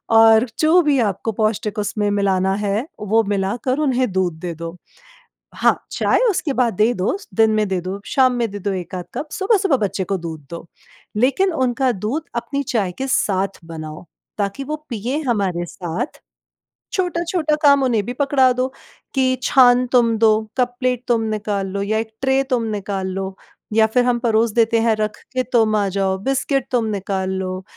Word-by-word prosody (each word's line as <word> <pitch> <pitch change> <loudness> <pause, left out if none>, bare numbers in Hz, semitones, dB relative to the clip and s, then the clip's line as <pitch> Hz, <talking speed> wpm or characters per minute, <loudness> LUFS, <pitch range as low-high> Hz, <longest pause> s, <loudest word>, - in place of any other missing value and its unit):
और 225 +1 +7
जो 325 +3 +5
भी 295 -4 +2
आपको 220 0 0
पौष्टिक 215 -1 -1
उसमें 210 0 -1
मिलाना, 190 -2 +1
है 205 +3 -1
वो 215 +2 +2
मिलाकर 205 +6 -1
उन्हें 255 -6 +1
दूध 185 -2 0
दे 175 0 -4
दो। 165 +1 -7 0.8
हाँ, - - +1
चाय - - +1
उसके 340 -6 -1
बाद 250 -4 +1
दे 215 +5 +3
दो 190 - 0 0.2
दिन 220 -1 +4
में 215 -1 +2
दे 190 -1 -1
दो 185 +3 -5
शाम 260 -2 +3
में 235 -3 -1
दो 200 - -1
1 180 -1 -5
आध 180 -1 -4
कप 305 - -4
सुबह 400 +3 +2
सुबह 355 -7 +2
बच्चे 205 -4 -2
को 195 - -1
दूध 165 -2 -6
दो, 170 0 -8 0.5
लेकिन 275 - +2
उनका 260 -2 +1
दूध 220 - -3
अपनी 280 +4 -2
चाय 215 -8 -1
के 270 - -2
साथ 195 -5 0
बनाओ 155 -1 -8 0.3
ताकि 200 +6 -2
वो 305 +3 -3
पिएँ 245 +6 -3
हमारे 195 -8 0
साथ। 180 - -5 0.7
छोटा-छोटा 345 -3 0
काम 280 -1 +6
उन्हें 235 -5 +1
भी 245 - -4
पकड़ा 265 -1 +3
दो 255 +1 0 0.5
कि 260 -1 +2
छान 250 -2 +5
तुम 235 -3 +3
दो, 220 -1 +3
कप 245 -1 +1
प्लेट 250 -2 0
तुम 235 -2 +2
निकाल 205 -2 -2
लो 200 +1 -3
या 210 +2 0
एक 220 0 -2
ट्रे 265 0 +2
तुम 250 -3 +1
निकाल 195 -2 -3
लो 190 0 -4 0.4
या 220 0 +5
फिर 245 +3 +2
हम 245 -1 +2
परोस 230 -1 +2
देते 230 0 +3
हैं 225 -1 +3
रख 215 0 -2 0.2
के 255 0 +1
तुम 220 -3 +3
आ 205 -1 +1
जाओ, 190 0 0
बिस्किट 270 +4 0
तुम 240 -3 +1
निकाल 195 -2 -2
लो 185 0 -3
220 Hz, 185 wpm, -20 LUFS, 195-255 Hz, 0.8 s, और